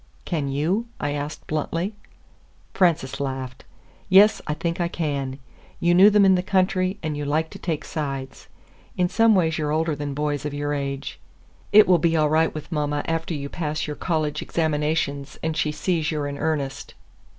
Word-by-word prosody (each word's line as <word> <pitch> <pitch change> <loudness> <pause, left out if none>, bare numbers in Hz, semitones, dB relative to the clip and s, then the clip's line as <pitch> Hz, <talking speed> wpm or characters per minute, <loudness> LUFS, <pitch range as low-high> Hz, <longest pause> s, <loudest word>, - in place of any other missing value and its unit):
"Can 155 -5 -2
you?" 165 +12 0
I 145 - -1
asked 145 +1 -5
bluntly. 165 +6 -2 0.8
Frances 165 -7 +1
laughed. 130 -2 -5 0.4
"Yes, 200 +3 +6
I 150 - -1
think 170 +2 -2
I 170 - +1
can. 140 -6 -3 0.4
You 175 0 +3
knew 190 +4 +8
them 205 -1 +5
in 190 - +6
the 180 - +2
country, 185 0 +1
and 155 -2 -2
you 145 - -3
like 155 +3 0
to - - -10
take 160 -4 -3
sides. 135 -3 -5 0.5
In 180 - +3
some 225 +3 +4
ways 160 -4 +1
you're 150 -1 -1
older 160 0 0
than 145 -1 -4
boys 150 -1 -1
of 150 -1 -4
your 145 0 -2
age. 140 -1 -4 0.5
It 215 0 +8
will 180 -2 +5
be 165 +1 +2
all 150 -1 +2
right 160 +1 +3
with 155 +3 -8
mama 145 -2 -1
after 165 0 -2
you 140 -1 -4
pass 155 0 -3
your 150 - -4
college 155 -3 -1
examinations 150 -3 -1
and 160 0 -1
she 155 -1 0
sees 155 +1 -1
you're 150 -2 -2
in 140 0 -5
earnest." 145 -4 -3
155 Hz, 185 wpm, -24 LUFS, 145-170 Hz, 0.8 s, knew